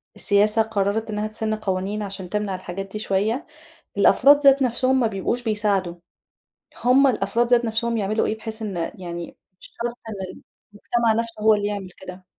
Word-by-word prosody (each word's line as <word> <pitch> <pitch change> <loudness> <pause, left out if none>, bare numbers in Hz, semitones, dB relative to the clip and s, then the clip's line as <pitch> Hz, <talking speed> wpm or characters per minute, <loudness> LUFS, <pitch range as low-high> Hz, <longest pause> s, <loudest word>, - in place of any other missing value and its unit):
السياسة 210 +2 +3
قررت 220 0 -1
إنها 210 0 -2
تسِن 215 0 -2
قوانين 200 0 -3
عشان 195 -2 -6
تمنع 210 -1 -2
الحاجات 185 +1 -7
دي 215 - -5
شويَّة، 215 - -1 0.5
الأفراد 285 +1 +6
ذات 275 -1 +5
نفسهم 255 +1 +1
ما 240 - +2
بيبقوش 220 +3 -2
بيساعدوا، 205 -5 0 0.9
همّ 260 +3 +5
الأفراد 230 -1 +1
ذات 240 0 +3
نفسهم 230 +1 0
يعملوا 215 +1 0
إيه 215 - -2
بحيث 220 0 -6
إن 205 -4 -4 0.2
يعني 175 -2 -7 0.2
مش - - -7 0.2
شرط 235 0 -2
إن 220 - -5 0.6
المجتمع 230 +2 0
نفسه 230 -1 -3
هو 220 0 +6
اللي 205 -1 -1
يعمل 200 -3 -4
كده؟ 185 0 -11
215 Hz, 165 wpm, -23 LUFS, 195-230 Hz, 0.9 s, الأفراد